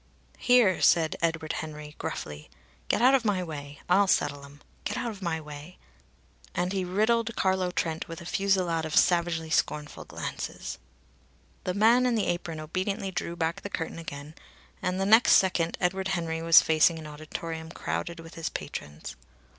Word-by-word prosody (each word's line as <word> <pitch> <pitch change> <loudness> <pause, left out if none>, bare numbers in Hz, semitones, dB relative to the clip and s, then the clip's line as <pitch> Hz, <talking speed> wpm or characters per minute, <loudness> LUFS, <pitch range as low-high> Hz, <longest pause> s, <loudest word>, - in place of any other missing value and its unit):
"Here!" 245 -7 +4
said 165 -2 +4
Edward 165 -2 -1
Henry 150 -1 -6
gruffly. 75 0 -6 0.4
"Get - - +1
out 260 +2 +7
of 265 -3 +4
my 200 -4 +1
way! 145 -3 -8
I'll 195 +3 +4
settle 145 -6 +1
'em. 140 +1 -14 0.2
Get - - -3
out 235 - -2
of 205 -2 -11
my 170 -3 -1
way!" 150 +3 -10 0.8
And 180 +2 0
he 190 -1 0
riddled 220 +5 +1
Carlo 190 -1 +1
Trent 165 -2 -2
with 165 -1 -7
a 170 - -10
fusillade 185 -4 +1
of 155 -1 -3
savagely 170 -2 +2
scornful 150 -1 -1
glances. - - -6 0.9
The 180 - -1
man 235 +5 +5
in 245 - +1
the 215 - +1
apron 175 -2 -2
obediently 190 +5 -3
drew 175 -1 -3
back 165 0 -2
the 200 - -6
curtain 165 -3 -4
again, 145 -2 -8 0.5
and 180 +1 -1
the 195 - +1
next 225 +5 +6
second 175 -3 +3
Edward 190 +2 0
Henry 165 -4 -2
was 165 0 +8
facing 160 +1 +4
an 160 - -8
auditorium 160 +2 -6
crowded 170 0 -4
with 165 0 -12
his 165 - -3
patrons. 75 +1 -7
170 Hz, 170 wpm, -28 LUFS, 160-190 Hz, 0.9 s, was